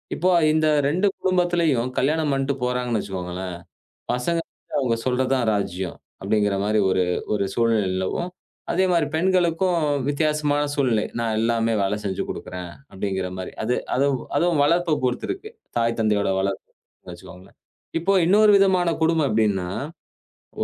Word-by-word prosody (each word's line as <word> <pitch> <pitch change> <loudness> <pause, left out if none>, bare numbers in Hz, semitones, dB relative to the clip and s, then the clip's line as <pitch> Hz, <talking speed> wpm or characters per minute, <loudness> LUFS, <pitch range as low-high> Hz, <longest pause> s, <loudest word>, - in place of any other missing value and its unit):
இப்போ 185 +3 +2 0.2
இந்த 155 0 +2 0.2
2 180 +7 +2
குடும்பத்துலயும் 175 -9 +1
கல்யாணம் 150 +2 +1
பண்ட்டு 135 +1 0
போறாங்கன்னு 125 -2 0
வச்சுக்கோங்களேன். 90 -1 -5 0.6
பசங்க 165 +7 0 0.4
அவுங்க 125 -4 +1
சொல்றதுதான் 130 -1 +1
ராஜ்யம் 95 -3 -3 0.2
அப்படிங்கிற 105 0 +1
மாரி 105 +1 +1
ஒரு 95 0 +2 0.3
ஒரு 100 -2 +1
சூழ்நிலை 115 -3 +2
நிலவும். 95 - -2 0.4
அதே 190 - +2
மாரி 170 -3 +3
பெண்களுக்கும் 180 0 +2 0.3
வித்தியாசமான 150 0 +1
சூழ்நிலை 125 -7 +1
நான் 115 -1 -1
எல்லாமே 115 0 +1
வேலை 100 +2 0
செஞ்சு 95 -2 -2
கொடுக்குறேன் 90 -1 -6 0.2
அப்படிங்கிற 95 -1 -3
மாரி. 95 - -6
அது 120 +3 0 0.2
அதுவு 140 0 +2 0.2
அதுவும் 170 -4 +2
வளர்ப்பை 170 +2 +2
பொறுத்திருக்கு. 375 - -3 0.3
தாய் 115 0 +1
தந்தையோட 105 -2 +1
வளர்ப்பு 95 0 -3 0.4
வச்சுக்கோங்களேன். 90 +2 -13 0.4
இப்போ 195 +4 +1
இன்னொரு 210 +4 +5
விதமான 185 -3 +3
குடும்பம் 160 -2 +2
எப்டின்னா? 105 -5 +1 0.9
ஒ - - +3
125 Hz, 130 wpm, -23 LUFS, 105-165 Hz, 0.9 s, இன்னொரு